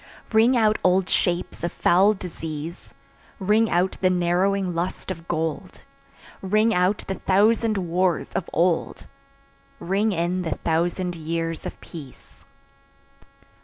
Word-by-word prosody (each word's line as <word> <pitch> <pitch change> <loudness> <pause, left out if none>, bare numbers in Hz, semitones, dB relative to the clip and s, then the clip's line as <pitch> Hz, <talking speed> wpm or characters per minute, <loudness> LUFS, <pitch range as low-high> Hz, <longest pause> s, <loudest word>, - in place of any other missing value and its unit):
Ring 230 +4 +5
out 215 -2 +3
old 185 0 +3
shapes 175 -1 -1
of 170 - -1
foul 190 +5 +4
disease, 165 -3 -7 0.5
Ring 210 +3 +2
out 180 +2 +1
the 185 - +4
narrowing 185 +1 +1
lust 175 +3 -3
of 165 -2 -8
gold; 160 +2 -3 0.6
Ring 215 +4 +2
out 180 +3 +1
the 195 - -1
thousand 215 +3 +2
wars 180 -1 0
of 175 - -3
old, 170 0 0 0.7
Ring 200 +5 0
in 175 0 -1
the 165 -3 -2
thousand 175 +2 0
years 165 0 -3
of - - -9
peace. 130 - -12
180 Hz, 125 wpm, -24 LUFS, 170-195 Hz, 0.7 s, Ring